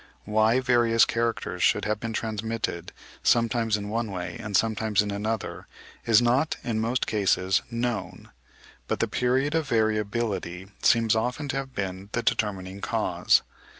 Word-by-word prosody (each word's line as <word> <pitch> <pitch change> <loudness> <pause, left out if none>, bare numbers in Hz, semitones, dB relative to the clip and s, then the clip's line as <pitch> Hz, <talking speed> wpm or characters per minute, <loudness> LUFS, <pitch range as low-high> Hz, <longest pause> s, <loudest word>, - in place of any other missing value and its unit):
Why 110 +3 +3
various 120 -2 +4
characters 115 0 -2
should - - +3
have 105 0 -1
been 115 0 -4
transmitted 110 -5 -3 0.3
sometimes 115 -1 +2
in 100 0 -6
one 115 0 -2
way 90 -3 -5
and 105 -3 0
sometimes 110 -1 +1
in 105 - -4
another, 105 +1 -3 0.4
is 115 +1 +5
not 130 +6 +2
in 115 -2 -1
most 120 +3 0
cases 95 -2 +1
known; 120 -1 -4 0.6
but - - -1
the - - +1
period 130 +4 +1
of 160 -3 0
variability 105 -4 -1
seems 115 -2 +4
often 125 +6 -2
to 135 - -1
have 135 -1 -5
been 95 0 -4
the 115 - -1
determining 95 -2 -1
cause. - - +2
110 Hz, 150 wpm, -26 LUFS, 105-120 Hz, 0.6 s, is